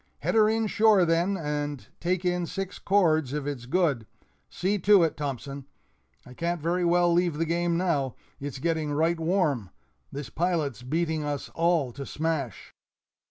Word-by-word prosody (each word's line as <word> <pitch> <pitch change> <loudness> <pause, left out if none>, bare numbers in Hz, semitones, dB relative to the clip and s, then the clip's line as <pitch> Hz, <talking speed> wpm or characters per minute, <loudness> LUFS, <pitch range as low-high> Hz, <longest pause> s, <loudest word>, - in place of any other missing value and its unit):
"Head - - 0
her 215 -1 +5
in 225 0 +1
shore, 210 -3 +4
then, 170 +4 +1
and 145 -3 -3
take 180 +1 -1
in 180 -1 0
six 195 +2 -5
cords 160 -8 +2
if 150 -2 -2
it's 135 -4 -5
good 145 -8 +1 0.4
see 200 +3 -1
to 200 0 +6
it, 160 - 0
Thompson; 140 -1 -5 0.6
I 125 - -12
can't 170 +5 -2
very 175 +3 0
well 175 0 +3
leave 175 -3 +1
the 165 - 0
game 170 +1 0
now 150 -8 0 0.2
it's 140 -1 -5
getting 160 0 -1
right 165 +3 +1
warm! 160 - 0 0.4
This 140 -3 -6
pilot's 155 - -1
beating 160 +4 -1
us 145 -1 -3
all 165 -6 +1
to 140 +3 -7
smash." 155 -7 -3
165 Hz, 160 wpm, -27 LUFS, 145-175 Hz, 0.6 s, to